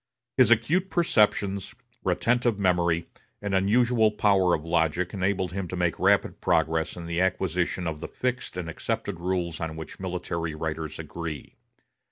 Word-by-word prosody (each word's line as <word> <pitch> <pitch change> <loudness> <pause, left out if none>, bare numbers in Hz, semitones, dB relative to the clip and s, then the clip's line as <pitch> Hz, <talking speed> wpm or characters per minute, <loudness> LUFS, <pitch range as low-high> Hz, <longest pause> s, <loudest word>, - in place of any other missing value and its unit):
His 130 -2 +5
acute 150 - +3
perceptions, 105 - +1 0.3
retentive 115 +5 +1
memory, 85 -4 +2 0.3
and 100 -1 -3
unusual 110 +4 +3
power 100 -4 +3
of 80 - -6
logic 85 +1 +1
enabled 95 -2 0
him 95 0 -3
to 90 - -5
make 90 -2 0
rapid - - +2
progress 80 0 +1
in 85 - -6
the 85 +1 -1
acquisition 90 -1 0
of 80 -2 -3
the - - -5
fixed 125 -6 -3
and 90 -2 -3
accepted 85 +2 -3
rules 90 -2 -2
on 80 -1 -4
which 80 -1 -8
military 85 -3 -3
writers 80 0 -4
agree. 80 -2 -6
90 Hz, 150 wpm, -26 LUFS, 85-100 Hz, 0.3 s, His